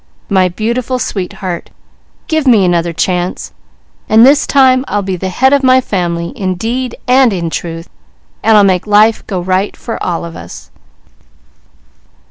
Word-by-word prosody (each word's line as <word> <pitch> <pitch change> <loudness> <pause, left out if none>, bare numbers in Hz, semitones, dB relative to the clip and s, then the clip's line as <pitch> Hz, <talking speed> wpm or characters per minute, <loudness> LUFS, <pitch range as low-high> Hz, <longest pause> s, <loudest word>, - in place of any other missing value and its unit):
My 190 -3 +2
beautiful 235 +6 -2
sweetheart, 190 -5 -5 0.6
give 315 -5 -1
me 220 -6 +5
another 170 -1 0
chance, 180 +2 -2 0.6
and 220 +2 +6
this 280 +2 +4
time 260 -2 +4
I'll 205 -1 -1
be 190 -1 -3
the 185 +1 -4
head 265 +8 +2
of 280 - +3
my 260 -1 +4
family 175 -7 -2
in 190 -8 -3
deed 240 +6 -3
and 255 -1 +4
in 170 -4 -3
truth, 165 0 -5 0.5
and 220 -1 +4
I'll 205 - +6
make 190 0 +1
life 210 +2 +3
go 190 -3 -3
right 185 +3 -1
for 230 - -6
all 170 -1 -3
of 165 - -9
us." - - -11
205 Hz, 155 wpm, -13 LUFS, 180-250 Hz, 0.6 s, and